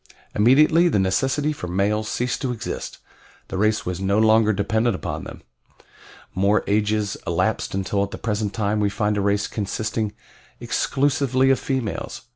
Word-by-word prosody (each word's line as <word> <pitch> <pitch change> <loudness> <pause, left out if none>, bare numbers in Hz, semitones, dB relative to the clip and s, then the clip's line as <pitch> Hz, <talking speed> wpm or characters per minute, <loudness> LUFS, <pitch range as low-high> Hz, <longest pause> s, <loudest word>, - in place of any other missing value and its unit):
Immediately 150 +10 +5
the - - +1
necessity 135 +11 +1
for 90 - -7
males 105 +4 0
ceased 125 0 -2
to 130 -3 -1
exist 115 -3 -5 0.5
the - - -4
race 110 +1 +1
was 90 0 -3
no 100 +1 +1
longer 110 0 +4
dependent 110 +2 0
upon - - -5
them. - - -10 0.9
More 100 +3 +2
ages 105 0 0
elapsed 90 +5 0
until 95 +1 -1
at 100 - -3
the - - -7
present 105 -2 -2
time 105 -1 -1
we 105 -1 +2
find 105 +1 0
a 100 - 0
race 100 +1 +1
consisting 110 +1 -3 0.5
exclusively 135 -1 +1
of 135 - +2
females. 130 -6 -3
105 Hz, 155 wpm, -22 LUFS, 100-120 Hz, 0.9 s, Immediately